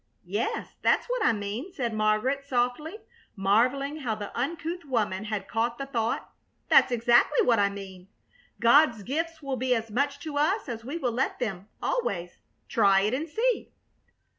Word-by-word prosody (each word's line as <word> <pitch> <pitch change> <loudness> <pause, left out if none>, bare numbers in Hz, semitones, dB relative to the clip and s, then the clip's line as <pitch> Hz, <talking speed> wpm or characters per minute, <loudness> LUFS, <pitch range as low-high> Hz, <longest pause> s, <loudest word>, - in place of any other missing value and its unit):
"Yes, 205 +5 -3
that's - - +3
what - - -1
I - - +5
mean," 215 - -4
said 245 -10 -3
Margaret, 215 +6 +1
softly, 280 - -1 0.3
marveling 250 +9 +2
how 245 -8 -2
the 205 -1 -7
uncouth 330 +7 -3
woman 215 -7 -1
had 210 -2 -3
caught 235 +1 -1
the 275 - -4
thought. 235 -4 -2 0.4
"That's - - +6
exactly 240 +4 +4
what 235 -3 +4
I 200 0 +3
mean. 190 -2 -9 0.5
God's 235 -2 +5
gifts 320 - -3
will 270 -2 -2
be 255 0 +1
as 225 -1 -4
much 280 +5 0
to 295 -2 -3
us 380 +8 +1
as 230 -3 -5
we 275 +7 -4
will 255 -7 -1
let 255 +4 -1
them, 200 -6 -4 0.2
always. 180 - -2 0.3
Try 200 -3 +4
it 210 +4 0
and 305 +5 -2
see." 470 +9 0
245 Hz, 165 wpm, -27 LUFS, 215-290 Hz, 0.5 s, That's